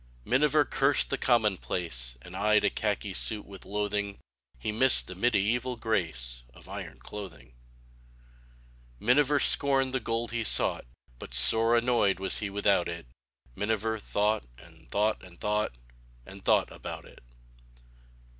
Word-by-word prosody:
Miniver 150 +3 +3
cursed 135 +1 +1
the 135 - 0
commonplace 90 - 0
And 90 - -11
eyed 105 +2 +2
a - - +2
khaki 105 -2 -2
suit 105 +2 0
with 100 -1 -12
loathing; 105 0 -2 0.4
He 65 - -3
missed 130 +4 +4
the 90 - -8
mediaeval 120 +4 0
grace 70 - -2
Of - - -13
iron - - -8
clothing. 95 -12 -9
|98| - - -25
i - - -27 1.5
Miniver 145 +4 +4
scorned 135 -2 +4
the 130 - +1
gold 115 0 -3
be 120 -1 -2
sought, 100 - +2 0.3
But 60 - -8
sore 110 - +5
annoyed 115 -5 +2
was 95 - +1
he 105 - -3
without 100 -3 +1
it; 85 -4 -7 0.5
Miniver 110 +2 -1
thought, 105 +1 0
and - - -18
thought, 105 - 0
and 85 -2 -15
thought. 105 - -1 0.5
And 95 0 -12
thought - - +2
about - - -8
it. - - -16
105 Hz, 145 wpm, -28 LUFS, 95-120 Hz, 1.5 s, sore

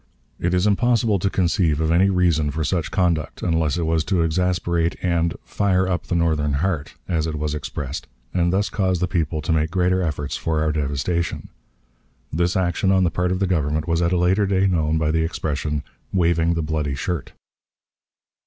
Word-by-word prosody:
It 90 +1 0
is 90 +2 +2
impossible 115 0 +2
to 95 - 0
conceive 85 -5 +1
any 85 +4 +3
reason 85 -5 +2
for 80 +3 -2
such 85 0 -1
conduct, 85 -5 0
unless 80 -2 +1
it 85 - -1
was 80 -1 +1
to 90 -4 +1
exasperate 85 0 0
and 85 -2 +1
"fire 95 -2 +1
up 90 -3 -2
the 85 - -1
Northern 80 -3 +1
heart," 80 0 -1
as 80 -3 0
it 80 - -3
was 75 0 -2
expressed, 70 -1 -5 0.3
and 85 -1 +2
thus 100 +2 0
cause 95 -3 +1
the 90 +1 0
people 80 -3 -1
to - - -1
make 80 0 +1
greater 90 +1 +1
efforts 75 -4 -2
for 80 -1 -1
our 80 0 +1
devastation. 75 +3 -2 0.8
This 85 +3 +1
action 95 +1 +1
on 95 -1 +4
the 85 - +2
part 90 +2 0
of 90 - 0
the 100 - +1
Government 80 -3 0
was 85 0 +1
at 85 0 +1
a 90 - +2
later 95 +4 +2
day 95 0 +2
known 80 -4 +1
by 80 -1 +1
the 80 +1 +1
expression 75 -2 -2 0.3
"waving 85 -2 +2
the 85 - -1
bloody 75 -2 -1
shirt." 85 +1 -4
85 Hz, 190 wpm, -22 LUFS, 80-90 Hz, 0.8 s, on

